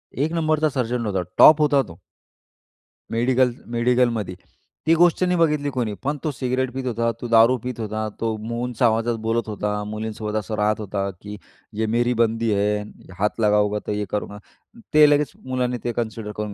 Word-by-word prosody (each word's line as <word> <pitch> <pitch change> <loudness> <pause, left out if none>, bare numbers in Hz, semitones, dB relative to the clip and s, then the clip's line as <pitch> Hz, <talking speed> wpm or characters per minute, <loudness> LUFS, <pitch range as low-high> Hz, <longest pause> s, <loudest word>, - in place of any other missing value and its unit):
एक 150 +4 0
नंबरचा 155 -2 +1
सर्जन 125 -2 -1
होता, 95 -3 -1 0.2
टॉप 155 0 +8
होता 145 -2 +4
तो 85 - -11 1.1
मेडिकल 125 +2 +2 0.2
मेडिकलमध्ये. 120 -5 +1 0.5
ती 165 - +6
गोष्ट 175 +2 +3
नाही 180 0 +2
बघितली 150 -3 +2
कोणी. 125 -6 -2
पण 145 +2 -1
तो 155 - -1
सिगरेट 130 -1 -2
पीत 130 0 -4
होता, 115 -1 0
तो 120 - -4
दारू 115 +2 +5
पीत 125 -2 -5
होता, 110 0 -3
तो 115 -1 -1
मो 115 0 -3
उंच 125 +1 -6
आवाजात 115 0 +2
बोलत 115 0 0
होता, 105 0 -2
मुलींसोबत 110 0 -5
असं 110 +1 -5
राहत 105 +1 +1
होता, 100 -1 -3
की 105 +1 -8 0.4
“ये 110 - +1
मेरी 120 +1 +2
बंदी 115 0 +1
है, 105 +1 +1 0.4
हात 105 +3 0
लगावोगे 105 -1 +2
तो - - -3
ये 105 0 -2
करूंगा,” 105 0 -4 0.5
ते 155 0 +8
लगेच 145 -3 +2
मुलाने 125 -1 -1
ते 120 - -1
कन्सिडर 110 -2 -4
करून 105 -1 -4
115 Hz, 180 wpm, -22 LUFS, 105-130 Hz, 1.1 s, टॉप